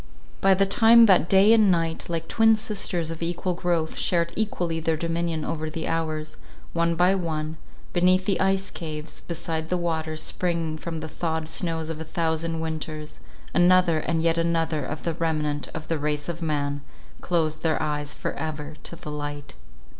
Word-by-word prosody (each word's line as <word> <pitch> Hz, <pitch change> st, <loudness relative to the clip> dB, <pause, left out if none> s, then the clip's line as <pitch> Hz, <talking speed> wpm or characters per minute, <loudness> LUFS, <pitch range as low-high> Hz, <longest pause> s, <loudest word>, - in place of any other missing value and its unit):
By 195 Hz, 0 st, +5 dB
the 195 Hz, +1 st, +3 dB
time 230 Hz, +3 st, +7 dB
that 185 Hz, -5 st, +4 dB
day 195 Hz, +3 st, +7 dB
and 215 Hz, -3 st, +5 dB
night, 165 Hz, -2 st, 0 dB
like 165 Hz, -1 st, -2 dB
twin 225 Hz, 0 st, +5 dB
sisters 195 Hz, -6 st, -2 dB
of 165 Hz, -, -7 dB
equal 175 Hz, +2 st, -1 dB
growth, 170 Hz, -2 st, -1 dB
shared 170 Hz, -1 st, +1 dB
equally 175 Hz, -6 st, -1 dB
their 160 Hz, 0 st, 0 dB
dominion 165 Hz, -1 st, -1 dB
over 155 Hz, -1 st, -3 dB
the 160 Hz, 0 st, -4 dB
hours, 155 Hz, -1 st, -2 dB, 0.4 s
one 170 Hz, 0 st, +1 dB
by 180 Hz, +3 st, +4 dB
one, 160 Hz, -4 st, -2 dB, 0.4 s
beneath 185 Hz, +1 st, +3 dB
the 195 Hz, -2 st, +1 dB
ice 195 Hz, 0 st, +1 dB
caves, 155 Hz, -2 st, -6 dB
beside 160 Hz, -1 st, -3 dB
the 180 Hz, -, +1 dB
waters 160 Hz, -2 st, -2 dB
springing 165 Hz, -3 st, -2 dB
from 165 Hz, 0 st, -5 dB
the 160 Hz, -, -5 dB
thawed 160 Hz, 0 st, -3 dB
snows 160 Hz, -1 st, -2 dB
of 160 Hz, -1 st, -4 dB
a -, -, -2 dB
thousand 165 Hz, 0 st, -1 dB
winters, 155 Hz, -1 st, -5 dB, 0.3 s
another 175 Hz, -2 st, +5 dB
and 165 Hz, +1 st, -1 dB
yet 165 Hz, 0 st, +2 dB
another 165 Hz, -2 st, 0 dB
of 145 Hz, +4 st, -5 dB
the 170 Hz, -, -1 dB
remnant 155 Hz, -3 st, -1 dB
of 155 Hz, -1 st, -6 dB
the 165 Hz, -2 st, -1 dB
race 150 Hz, 0 st, -2 dB
of 170 Hz, 0 st, -5 dB
Man, 145 Hz, -3 st, -1 dB, 0.4 s
closed 160 Hz, -3 st, 0 dB
their 160 Hz, -2 st, +1 dB
eyes 150 Hz, -1 st, -2 dB
for -, -, -3 dB
ever 150 Hz, 0 st, -5 dB
to -, -, -7 dB
the 150 Hz, -, -8 dB
light. 145 Hz, -1 st, -5 dB
165 Hz, 175 wpm, -25 LUFS, 155-175 Hz, 0.4 s, time